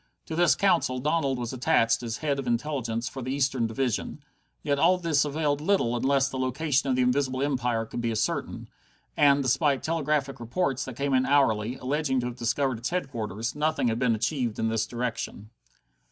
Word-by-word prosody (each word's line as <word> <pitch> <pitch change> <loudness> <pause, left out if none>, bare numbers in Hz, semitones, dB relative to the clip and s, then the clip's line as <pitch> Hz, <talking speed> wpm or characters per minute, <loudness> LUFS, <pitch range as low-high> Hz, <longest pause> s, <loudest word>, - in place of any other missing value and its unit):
To 160 - -5
this 175 -1 +4
Council 135 -10 +2
Donald 140 0 0
was 120 0 -4
attached 115 -4 +2
as 115 -2 -4
head 140 -2 +1
of 135 - -5
Intelligence 120 -2 -1
for 130 - -6
the 130 +1 -4
Eastern 135 -4 +1
Division. 120 0 -2 0.4
Yet 140 0 0
all 180 +4 +4
this 165 -5 +2
availed 145 0 -1
little 155 -9 +1
unless 135 +2 +2
the 135 -1 -5
location 135 +2 0
of 130 - +2
the 130 - +2
Invisible 130 +1 +1
Empire 125 -5 0
could 120 - -5
be 115 - -1
ascertained, 110 -2 -2 0.4
and, 140 -1 +4
despite 135 +2 +1
telegraphic 150 -4 -1
reports 130 +3 -1
that 130 - -7
came 140 +1 -1
in 130 0 +3
hourly, 125 -5 +2
alleging 135 0 -1
to - - -4
have 125 -1 -4
discovered 125 +1 0
its 120 - -3
headquarters, 120 - -3
nothing 150 -4 0
had 115 +1 -1
been 125 -3 +2
achieved 120 0 -1
in 110 - 0
this 110 -1 0
direction. 115 -3 -4
130 Hz, 185 wpm, -27 LUFS, 120-145 Hz, 0.4 s, this